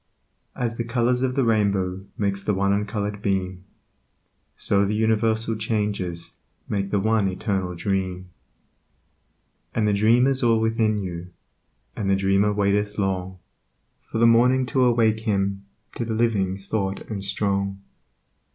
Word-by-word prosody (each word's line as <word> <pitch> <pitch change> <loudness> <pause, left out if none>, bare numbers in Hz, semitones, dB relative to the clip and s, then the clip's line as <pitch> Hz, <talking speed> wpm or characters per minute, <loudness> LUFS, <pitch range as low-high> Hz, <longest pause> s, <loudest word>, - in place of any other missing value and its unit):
As 115 -2 -2
the 115 - -1
colors 120 +1 +1
of 130 -1 0
the 135 - +2
rainbow 100 -4 0
Makes 100 -1 -1
the 105 - 0
one 100 +1 +2
uncolored 105 0 -2
beam, 95 -2 -2 0.9
So 100 0 +1
the 100 +2 0
universal 110 +1 +1
changes 105 -5 -3 0.3
Make 100 -1 -2
the 100 - +1
One 110 0 +2
Eternal 95 -1 -2
Dream. 95 0 -2 1.4
And 110 -2 +2
the 105 - +2
Dream 115 +5 +4
is 135 0 +2
all 115 -2 +3
within 110 -1 +1
you, 90 -3 -5 0.7
And 100 -2 -2
the 100 - +4
Dreamer 95 +2 +2
waiteth 105 0 0
long 95 -2 -2 0.7
For - - -2
the 115 - +4
Morning 125 +3 +4
to 130 -2 +4
awake 115 -3 +3
him 100 -3 -1 0.3
To - - -1
the 115 -1 -3
living 105 -5 +1
thought 100 0 -3
and 100 -3 -6
strong. 100 -1 -1
105 Hz, 140 wpm, -24 LUFS, 95-110 Hz, 1.4 s, Dream